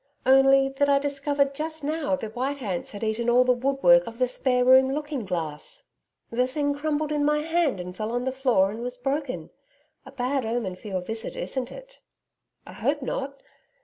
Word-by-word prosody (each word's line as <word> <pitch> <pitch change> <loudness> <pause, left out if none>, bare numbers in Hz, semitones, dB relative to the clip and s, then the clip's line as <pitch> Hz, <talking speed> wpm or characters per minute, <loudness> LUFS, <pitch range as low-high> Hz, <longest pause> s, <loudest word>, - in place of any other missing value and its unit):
'Only 270 +1 +6
that 275 +1 0
I 280 - +5
discovered 280 0 0
just 315 +1 -4
now 295 -1 0
the 225 -6 -6
white 270 +5 -3
ants 195 -8 -3
had 205 +1 -7
eaten 225 +2 0
all 245 +1 +5
the 255 - +3
woodwork 245 -10 +3
of 230 0 -8
the 255 0 +2
spare 250 0 +1
room 260 +1 +6
looking 290 -4 -3
glass. 160 -5 -3 0.5
The 250 +2 +1
thing 285 +2 -1
crumbled 300 +1 -2
in 295 -1 0
my 300 +1 +2
hand 325 - 0
and 180 0 -7
fell 215 +3 -3
on 245 +1 -1
the 260 - -1
floor 250 -8 +2
and 220 +3 -7
was 245 +1 -4
broken. 275 +1 -3 0.5
A - - -12
bad 265 0 -1
omen 225 -4 -2
for 200 - -12
your 190 -3 -2
visit, 220 +5 -4
isn't 260 -2 -3
it?' - - -11 0.7
'I - - -11
hope 290 0 -1
not. 270 +1 -4
265 Hz, 195 wpm, -25 LUFS, 230-285 Hz, 0.7 s, Only